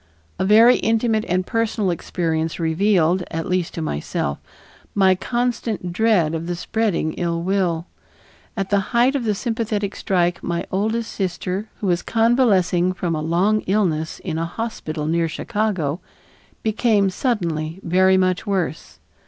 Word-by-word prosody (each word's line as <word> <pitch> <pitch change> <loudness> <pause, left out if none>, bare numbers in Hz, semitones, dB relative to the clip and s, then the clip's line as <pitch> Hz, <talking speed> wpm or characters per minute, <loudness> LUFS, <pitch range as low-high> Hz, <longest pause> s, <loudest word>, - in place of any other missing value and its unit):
A - - +1
very 225 +5 +7
intimate 225 -1 +1
and 185 +1 0
personal 220 -3 0
experience 165 -1 -2
revealed, 175 +1 +2
at 165 -1 -3
least 180 -2 -1
to 165 - -3
myself, 70 - -2 0.6
my 190 -2 +5
constant 230 -3 -2
dread 190 -6 +2
of 165 +1 -3
the 175 - -2
spreading 190 -4 -1
ill 170 -1 -1
will. 180 -3 0 0.7
At 195 -1 -2
the 200 - +4 0.2
height 250 +3 +4
of 260 -4 -1
the 210 -2 +1
sympathetic 215 -3 -2
strike 175 -3 0
my 170 -1 -2
oldest 220 +4 -1
sister, 185 +2 -3
who - - -2
was 175 -2 +1
convalescing 200 -7 +2
from 175 -2 -2
a 155 - -2
long 185 +7 +2
illness 175 -6 0
in 160 - -4
a 165 - -1
hospital 170 -7 -4
near 165 +1 +1
Chicago, 190 -5 -1 0.6
became 215 -3 +2
suddenly 170 - -2
very 185 +2 +4
much 185 +2 +1
worse. 185 -5 -2
185 Hz, 145 wpm, -21 LUFS, 170-215 Hz, 0.7 s, very